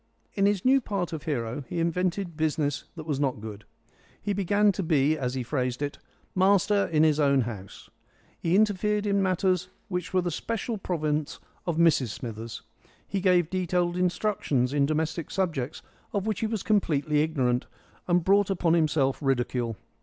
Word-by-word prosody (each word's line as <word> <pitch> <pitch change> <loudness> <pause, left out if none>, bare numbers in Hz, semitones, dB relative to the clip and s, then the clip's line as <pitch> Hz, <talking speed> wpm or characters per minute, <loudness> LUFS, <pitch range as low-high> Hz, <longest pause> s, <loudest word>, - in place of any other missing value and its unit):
In 195 0 +3
his 205 0 0
new 270 +1 +5
part 195 -7 -3
of 155 -2 -5
hero 125 -3 -2
he 175 - -2
invented 175 +1 -1
business 150 -2 -1
that 160 -2 -7
was 145 -4 -2
not 135 -6 0
good. 105 -1 -8 0.5
He 205 - -2
began 205 +2 +3
to 195 - -3
be, 155 -3 +2
as 130 -4 -2
he 130 - -2
phrased 125 -1 -2
it, 145 +1 -4 0.3
"master 200 +2 +3
in 155 -1 +3
his 155 -1 +3
own 140 -2 +4
house." 105 -5 -7 0.5
He 170 +2 +1
interfered 210 0 +2
in 200 -1 +2
matters 185 -1 +1 0.2
which 180 -2 -3
were 185 -1 +2
the 175 - -1
special 230 +5 -3
province 155 -4 -1 0.3
of 170 -2 0
Mrs 165 -6 +4
Smithers. 115 0 -6 0.4
He 195 - -2
gave 180 -3 +3
detailed 180 -1 0
instructions 180 - 0
in 140 -1 +3
domestic 160 +1 -1
subjects 160 -9 -2 0.3
of 200 -1 -1
which 215 -3 -1
he 225 - 0
was 215 -3 -3
completely 150 -8 +2
ignorant, 130 -5 0 0.4
and 175 -1 +3
brought 200 +2 +4
upon 175 -3 +2
himself 150 -5 +2
ridicule. 120 -4 0
165 Hz, 170 wpm, -27 LUFS, 140-190 Hz, 0.5 s, new